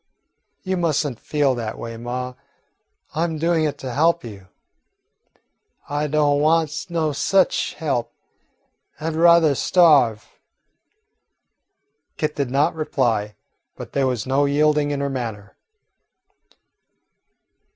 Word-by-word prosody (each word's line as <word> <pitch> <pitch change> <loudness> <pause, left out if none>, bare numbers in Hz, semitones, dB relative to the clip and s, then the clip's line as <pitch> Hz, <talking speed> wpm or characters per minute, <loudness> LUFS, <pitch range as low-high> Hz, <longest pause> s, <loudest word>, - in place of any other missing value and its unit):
"You 190 -1 -2
must 160 -4 +1
n't 125 -5 -5
feel 145 -3 0
that 115 -3 -4
away, 115 0 -7
ma. 125 +2 -5 0.8
I 160 - 0
'm 165 -2 -2
doin' 165 0 +1
it 150 - -2
to 130 -2 -6
help 165 +4 +2
you." 100 -5 -10 1.4
"I 145 +1 -1
do' 150 0 +1
want 155 +1 +1
no 160 -3 0
sich 190 +6 +1
help. 125 -7 -2 0.9
I 160 +1 -2
'd - - -6
ruther 170 -2 +5
starve." 140 - +3 1.9
Kit 155 -1 -2
did 140 -3 -2
not 140 +3 +1
reply, 120 -9 -1 0.4
but - - -9
there 135 -1 +1
was 125 -4 -2
no 135 +2 +2
yielding 150 +1 +2
in 145 -1 -2
her 140 - -1
manner. 110 -6 -6
145 Hz, 120 wpm, -21 LUFS, 125-160 Hz, 1.9 s, ruther